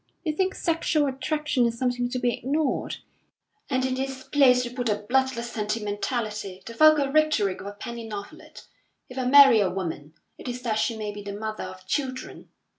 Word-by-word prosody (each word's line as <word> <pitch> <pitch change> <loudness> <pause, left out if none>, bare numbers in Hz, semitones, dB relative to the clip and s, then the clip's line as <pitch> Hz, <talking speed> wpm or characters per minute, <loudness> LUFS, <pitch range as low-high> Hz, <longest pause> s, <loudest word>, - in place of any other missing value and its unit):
You 315 -4 -1
think 380 +4 0
sexual 320 -2 +1
attraction 270 -1 0
is 230 0 -4
something 245 -1 0
to 255 - -3
be 245 -1 +1
ignored, 290 +2 -1 0.7
and 260 -2 +1
in 260 0 -1
its 265 0 -4
place 250 -3 +4
you 240 - -6
put 245 -2 -2
a 210 0 -2
bloodless 260 -2 0
sentimentality 210 -1 -3
the 230 - -7
vulgar 305 0 +5
rhetoric 290 -11 +2
of 200 - -8
a 205 - -6
penny 230 +2 -7
novelette. 210 +9 -9 0.4
If 255 +1 -6
I 255 - -1
marry 270 -3 +8
a 195 -3 +2
woman, 165 -5 -5 0.2
it - - -9
is 250 0 -5
that 220 -3 0
she 230 0 0
may 210 -1 -4
be 205 - -8
the 200 0 -6
mother 215 0 -5
of 185 0 -10
children. 255 +4 -4
245 Hz, 190 wpm, -26 LUFS, 210-270 Hz, 0.7 s, marry